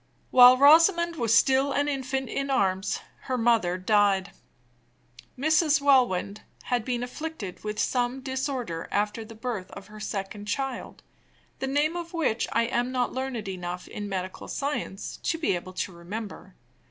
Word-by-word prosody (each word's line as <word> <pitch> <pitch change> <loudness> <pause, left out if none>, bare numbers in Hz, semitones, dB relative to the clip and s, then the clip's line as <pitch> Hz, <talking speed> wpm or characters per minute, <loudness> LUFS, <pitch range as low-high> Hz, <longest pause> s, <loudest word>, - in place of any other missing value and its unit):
While 250 0 +9
Rosamond 335 +4 +6
was 230 -3 +3
still 270 +2 +3
an 285 +1 +1
infant 265 -1 -2
in 275 0 -3
arms, 195 -7 0 0.2
her 255 - -1
mother 225 -7 +2
died. 200 0 +2 1.1
Mrs. 305 +1 +3
Welwyn 245 -9 +3 0.3
had 245 -3 -1
been 245 0 -2
afflicted 250 - -6
with 210 0 -4
some 245 +2 0
disorder 260 - -3
after 210 +2 -1
the 225 +1 -12
birth 220 -5 -4
of 195 - -9
her 215 0 -11
second 205 0 -5
child, 270 +3 -4 0.6
the 265 - -2
name 295 +4 +1
of 345 0 -6
which 275 -9 0
I 230 - +2
am 245 +1 -1
not 250 -1 -1
learned 255 -5 -4
enough 180 -1 -5
in 205 -1 -6
medical 185 -1 -5
science 280 -9 -4
to 330 - -1
be 320 -10 0
able 185 +1 -7
to 185 - -3
remember. 190 +2 -8
245 Hz, 155 wpm, -27 LUFS, 205-275 Hz, 1.1 s, While